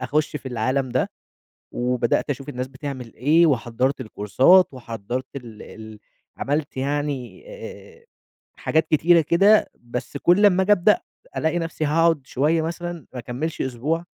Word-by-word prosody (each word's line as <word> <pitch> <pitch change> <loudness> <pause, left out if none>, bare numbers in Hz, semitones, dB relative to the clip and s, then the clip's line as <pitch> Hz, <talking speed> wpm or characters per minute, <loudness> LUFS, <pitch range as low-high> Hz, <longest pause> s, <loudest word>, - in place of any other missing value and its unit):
أخُش 150 0 -1
في 135 - -7
العالَم 130 +3 -1
ده. - - -1 0.6
وبدأت 125 +2 0
أشوف 135 0 -5
الناس 125 -2 -4
بتعمل 130 -3 -7
إيه، 155 +7 +4
وحضّرت 130 -1 0
الكورسات 130 - +4
وحضّرت 120 +1 -5
ال 115 -5 -9
ال 110 -1 -11 0.4
عملت 145 0 -2
يعني 140 - -3
آآ 470 -1 -11 0.5
حاجات 160 0 0
كتيرة 165 +2 +4
كده، 195 +7 +4
بس 120 +3 -6
كل 180 +8 +4
أمّا 190 -2 +4
آجي 200 - +1
أبدأ 205 +1 +4 0.4
ألاقي 160 +2 0
نفسي 165 -2 -3
هاقعد 165 0 +2
شويّة 155 +5 +1
مثلًا 170 -1 -5
ما 125 - -6
أكمّلش 125 +7 -4
أسبوع، 145 +7 -2
145 Hz, 140 wpm, -23 LUFS, 125-165 Hz, 0.6 s, إيه